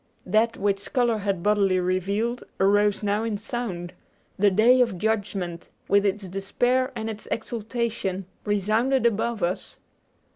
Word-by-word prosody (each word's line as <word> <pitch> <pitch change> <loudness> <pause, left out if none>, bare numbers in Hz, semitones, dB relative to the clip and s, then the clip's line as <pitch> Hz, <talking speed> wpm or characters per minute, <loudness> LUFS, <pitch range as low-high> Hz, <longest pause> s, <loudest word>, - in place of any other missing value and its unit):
That 220 +4 +2
which 200 0 -1
color 240 -4 +2
had 195 -4 -2
bodily 200 -3 +3
revealed 200 +6 -1 0.2
arose 205 +1 +3
now 205 +1 +1
in 225 -2 -1
sound; 200 -6 -5 0.4
the 205 +1 +4
day 230 +6 +5
of 230 -7 +1
judgment, 195 -4 -2 0.2
with 200 0 +4
its 200 0 -2
despair 245 +8 0
and 220 - -3
its 215 -1 -6
exultation, 225 -4 -3 0.2
resounded 215 +6 +1
above 230 -2 0
us. 175 +2 -2
205 Hz, 135 wpm, -25 LUFS, 195-230 Hz, 0.4 s, day